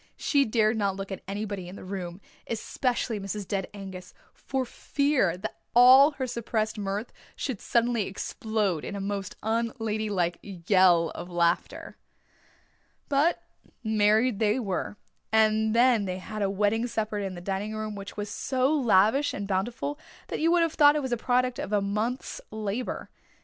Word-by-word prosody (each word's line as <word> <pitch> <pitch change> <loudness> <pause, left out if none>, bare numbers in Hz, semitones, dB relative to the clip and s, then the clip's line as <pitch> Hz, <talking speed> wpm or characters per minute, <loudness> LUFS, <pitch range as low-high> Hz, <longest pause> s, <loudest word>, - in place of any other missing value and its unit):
She 280 -2 +2
dared 220 0 +2
not 200 -2 0
look 195 0 -6
at 190 - -5
anybody 200 -2 -4
in 180 - -9
the - - -10
room, 185 -1 -6 0.3
especially 235 0 -1
Mrs. 195 0 -5
Dead 195 -2 -2
Angus, 190 -3 -9 0.2
for 265 -1 -3
fear 255 - 0 0.4
all 260 +5 +8
her 265 -2 -3
suppressed 230 -2 -2
mirth 200 +3 -3 0.2
should 260 -8 -4
suddenly 235 -3 +1
explode 200 -3 -2
in - - -5
a - - -4
most 195 -1 -4
un 225 +2 +1
young 230 - -11
ladylike 210 -6 -1
yell 180 -3 +3
of 175 - -8
laughter. 170 -1 -1 1.1
But 290 +4 +2 0.4
married 220 +1 +3
they 215 +2 +2
were, 205 -2 -3 0.3
and 220 0 +3
then 235 -3 +4
they 185 -1 -3
had 215 +3 -6
a 200 - +1
wedding 210 +4 +1
supper 215 -2 -2
in 195 -2 -4
the - - -7
dining 195 +4 -3
room 215 0 -4
which 200 0 -8
was 205 0 -3
so 260 +5 0
lavish 245 0 +3
and 200 0 -4
bountiful 235 +9 -2 0.3
that - - -3
you 325 - +3
would 345 -1 +4
have 330 -1 0
thought 290 -1 +6
it 300 - 0
was 260 - -3
the 240 - +1
product 250 +1 +1
of - - -4
a 210 - +3
month's 215 +6 -2
labour. 215 +3 -4
215 Hz, 165 wpm, -27 LUFS, 195-240 Hz, 1.1 s, all